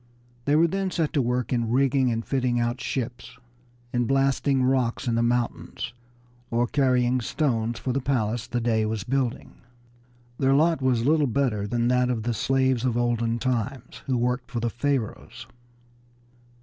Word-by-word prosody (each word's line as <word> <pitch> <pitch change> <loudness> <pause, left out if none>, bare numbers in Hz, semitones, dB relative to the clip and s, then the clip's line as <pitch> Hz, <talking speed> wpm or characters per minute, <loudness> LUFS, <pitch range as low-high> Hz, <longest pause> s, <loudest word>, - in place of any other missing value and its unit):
They 145 - +3
were 160 +2 +5
then 195 +3 -1
set 165 -4 -1
to 145 - +2
work 125 +1 -1
in 120 -2 0
rigging 135 +1 +2
and 115 0 -2
fitting 125 -3 0
out 120 +2 -1
ships, 125 0 -4 0.6
in 120 -1 +1
blasting 135 0 +2
rocks 130 0 0
in 120 - +1
the 115 - +2
mountains, 120 0 -2 0.6
or 120 +1 +1
carrying 125 -2 +2
stones 115 -4 -1
for 130 +2 -2
the 135 - 0
palace 120 -4 -1
the 120 - -1
Dey 115 -2 +1
was 110 -2 -2
building. 130 0 -2 0.8
Their 135 0 +3
lot 160 +1 +3
was 125 -3 +2
but 140 - +3
little 155 -3 +3
better 115 -5 0
than 120 +1 0
that 125 0 +2
of 115 -3 -1
the 120 +1 -1
slaves 130 0 +1
of 125 -2 0
olden 120 -1 0
times 125 0 -3
who 130 -2 +1
worked 125 +1 -1
for 125 -2 -3
the 115 0 -1
Pharaohs. 135 -3 -3
125 Hz, 170 wpm, -25 LUFS, 120-135 Hz, 0.8 s, were